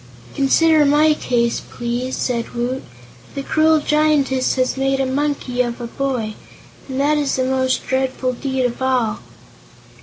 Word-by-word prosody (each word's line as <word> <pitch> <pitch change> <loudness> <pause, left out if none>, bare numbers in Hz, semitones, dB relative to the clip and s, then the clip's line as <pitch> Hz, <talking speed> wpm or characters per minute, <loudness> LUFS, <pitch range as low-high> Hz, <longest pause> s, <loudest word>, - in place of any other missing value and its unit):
"Consider 310 +3 +4
my 300 +2 +4
case, 235 -5 0
please," 240 +2 -4
said 235 -1 -2
Woot. 245 +2 -2 0.5
"The 275 - -3
cruel 315 +2 +3
Giantess 295 -4 +1
has 255 -1 0
made 270 0 0
a 270 - +1
Monkey 265 -2 -1
of 240 -1 -3
a 240 - -5
Boy, 240 -3 -3 0.6
and 260 0 -3
that 300 +2 +2
is 285 -2 0
the 260 - 0
most 260 0 0
dreadful 260 -1 -1
deed 265 0 -2
of 245 +1 -3
all!" 250 -4 0
265 Hz, 150 wpm, -19 LUFS, 250-285 Hz, 0.6 s, Consider